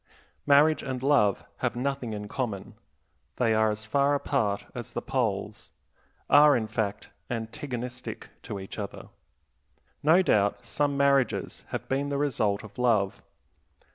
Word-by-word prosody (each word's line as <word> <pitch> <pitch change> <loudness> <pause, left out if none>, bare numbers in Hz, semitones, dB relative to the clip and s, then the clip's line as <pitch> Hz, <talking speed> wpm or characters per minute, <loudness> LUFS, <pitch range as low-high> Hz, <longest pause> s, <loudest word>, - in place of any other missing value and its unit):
Marriage 150 +2 +5
and 130 -1 -4
love 135 -9 +3
have - - -1
nothing 130 -1 -2
in 105 0 -5
common; 110 -5 -4 0.6
they 115 -3 +2
are 110 0 +3
as 105 +1 -4
far 140 +5 +2
apart 115 -8 0
as - - -7
the - - -1
poles; - - -2 0.6
are, 145 0 +7
in 110 - -1
fact, 110 -1 -3 0.2
antagonistic 125 +1 -5
to 105 -5 -6
each 95 +3 -8
other. 100 -1 -7 0.9
No 165 +5 +5
doubt 100 - +2
some 145 -1 0
marriages 140 -2 +1
have - - -5
been 140 +2 -1
the 140 - -1
result 110 -8 0
of 110 +2 -12
love. 110 -6 +2
125 Hz, 140 wpm, -27 LUFS, 105-140 Hz, 0.9 s, are